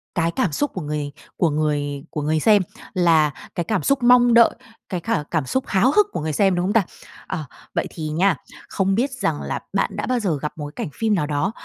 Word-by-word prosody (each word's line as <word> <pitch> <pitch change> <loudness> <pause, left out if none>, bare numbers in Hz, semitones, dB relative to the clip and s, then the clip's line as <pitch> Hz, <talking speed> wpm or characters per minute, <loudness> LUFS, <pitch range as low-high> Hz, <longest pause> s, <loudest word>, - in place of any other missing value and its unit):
cái 165 -1 +1
cảm 170 +1 0
xúc 290 - -1
của 185 - -4
người 150 -1 -3 0.3
của 170 - +3
người 145 -2 -1
của 150 - -4
người 155 +2 +1
xem 205 +4 +5 0.3
là 165 -4 +4 0.2
cái 175 - 0
cảm 195 +3 -1
xúc 275 -2 +1
mong 245 -1 +6
đợi, 235 0 +7 0.4
cái 180 -3 -2
cả 165 -5 -1
cảm 155 -5 0
xúc 260 - -1
háo 210 +7 +3
hức 420 +5 +4
của - - -3
người 155 -1 -2
xem, 195 +3 +3
đúng 175 0 0
không 200 - 0
ta? 225 -4 +4 0.4
Ờ, 160 -6 -4 0.3
vậy - - 0
thì 155 -1 -6
nha, 175 +3 +2 0.3
không 195 -1 +1
biết 265 +4 +1
rằng 260 - -2
là - - -3
bạn - - 0
đã - - -2
bao 255 -1 0
giờ 180 -9 0
gặp 150 +1 -4
một 150 - -5
cái - - -3
cảnh - - -8
phim 220 -2 +2
nào 150 -6 0
đó, 150 +7 0
175 Hz, 240 wpm, -22 LUFS, 150-220 Hz, 0.4 s, đợi